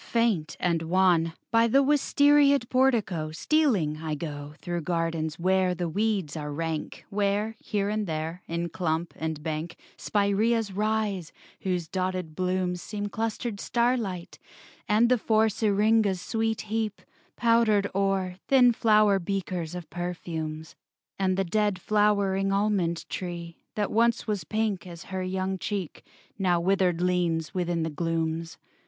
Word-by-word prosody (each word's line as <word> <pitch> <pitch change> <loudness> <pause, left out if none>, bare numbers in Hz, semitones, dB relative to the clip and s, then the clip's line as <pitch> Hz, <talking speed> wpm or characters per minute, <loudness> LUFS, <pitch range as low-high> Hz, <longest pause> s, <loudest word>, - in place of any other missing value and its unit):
Faint 215 -10 0
and 170 -2 +1
wan, 170 -1 +3 0.2
By 230 0 +4
the 275 +4 +4
wistariaed 285 -1 +4
portico 220 -12 +1
Stealing, 195 - +1
I 155 -1 -3
go 145 -1 -6
Through 175 -1 -3
gardens 165 -1 -1
where 185 +1 +2
the 175 0 -2
weeds 195 -3 -1
are 150 -2 -4
rank: 160 +1 -4
Where, 205 +2 0
here 200 -2 -1
and 210 0 -1
there, 160 +2 -3
in 170 +1 -2
clump 165 0 -2
and 160 -2 -4
bank, 160 +1 -3 0.2
Spiræas 205 +1 +1
rise, 210 -4 -1 0.3
whose 180 -3 -2
dotted 185 -3 -3
blooms 180 0 -1
Seem 205 -1 -4
clustered 225 0 -3
starlight; 235 -8 -1 0.5
and 215 +3 +4
the 250 0 +3
four 220 0 +3
Syringas 210 -1 +2
sweet 225 +1 -1
heap, 215 -1 -3 0.3
powdered 230 -4 +3
o'er, 195 -2 0
Thin 250 -3 +6
flower 215 -3 +4
beakers 180 -2 -3
of 175 -2 -7
perfumes; 160 -3 -5 0.4
And 190 -1 +1
the 195 - +2
dead 205 +1 +1
flowering 200 -1 +2
almond 195 -4 0
tree, 170 -2 -6 0.2
That 210 -1 -1
once 235 +1 +2
was 205 -7 -2
pink 215 -4 -1
as 170 -1 -9
her 190 - -1
young 185 +1 -2
cheek, 195 -6 -4 0.4
Now 180 -3 +2
withered 180 -1 +2
leans 175 -3 0
within 175 -2 -1
the 160 - -2
glooms. 165 +1 -2
190 Hz, 135 wpm, -27 LUFS, 170-215 Hz, 0.5 s, Thin